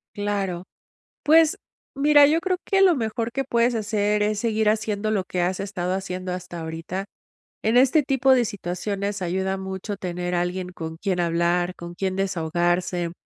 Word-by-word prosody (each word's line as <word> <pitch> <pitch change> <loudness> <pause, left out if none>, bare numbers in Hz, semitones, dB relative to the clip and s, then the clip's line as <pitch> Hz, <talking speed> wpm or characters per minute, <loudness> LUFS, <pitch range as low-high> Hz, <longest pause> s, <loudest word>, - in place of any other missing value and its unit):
Claro. 200 -4 -2 0.6
Pues, 320 +1 +5 0.4
mira 290 +1 +6
yo 310 +3 +3
creo 370 0 0
que 390 0 +2
lo 370 -3 +6
mejor 230 -1 -2
que 270 +2 -1
puedes 235 -1 +1
hacer 210 -1 +1
es 210 0 0
seguir 220 -1 0
haciendo 215 0 0
lo 200 -3 +1
que 180 - -2
has 180 +1 0
estado 185 -2 -2
haciendo 185 -1 -4
hasta 180 -1 -6
ahorita. 165 +4 -5 0.6
En 220 +2 +2
este 265 +5 +5
tipo 270 -1 +3
de 250 -2 +4
situaciones 200 0 -3
ayuda 190 +2 -1
mucho 190 +2 -5
tener 180 -1 -3
alguien 180 +1 -2
con 160 -2 -7
quien 185 +1 -1
hablar, 175 +1 +1
con 170 0 -9
quien 190 +1 -2
desahogarse 175 -1 0
195 Hz, 165 wpm, -24 LUFS, 180-225 Hz, 0.6 s, mira